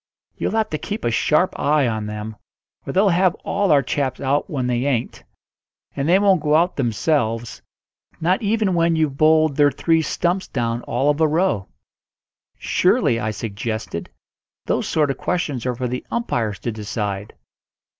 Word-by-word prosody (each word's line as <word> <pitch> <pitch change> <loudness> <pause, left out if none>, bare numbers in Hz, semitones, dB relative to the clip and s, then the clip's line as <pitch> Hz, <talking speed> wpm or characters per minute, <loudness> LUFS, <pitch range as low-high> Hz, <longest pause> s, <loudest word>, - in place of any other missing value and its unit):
You'll - - -2
have 220 -1 0
to 155 - -2
keep 210 +2 -5
a 120 - +1
sharp 150 +10 +1
eye 145 -2 +2
on 110 -2 -2
them, 105 +1 -6 0.5
or - - -2
they'll 195 +2 +3
have 180 0 +3
all 200 -3 +1
our 140 -2 +5
chaps 130 0 -2
out 140 +6 0
when 135 -7 -2
they 125 +1 0
ain't; 125 -5 -2 0.7
and 140 +2 -1
they 180 - +6
won't 195 -4 +3
go 150 0 +2
out 170 +3 +2
themselves, 120 -2 -1 0.6
not 180 +4 +1
even 215 -2 +1
when 170 -1 +2
you've 155 -4 0
bowled 155 -1 +3
their 145 -1 +5
three 165 +2 +1
stumps 175 +4 -1
down 120 -2 -2
all 145 +2 +2
of 145 +2 -3
a 160 - +5
row." 155 - 0 0.9
"Surely," 115 -1 +2
I 110 - -2
suggested, 110 -3 -4 0.6
"those - - 0
sort 150 -3 +1
of 135 - -7
questions 145 -9 -2
are 125 - -1
for 125 +1 -2
the 125 +1 -4
umpires 115 - -1
to 120 - -2
decide." 105 -1 -4
145 Hz, 170 wpm, -21 LUFS, 115-170 Hz, 0.9 s, they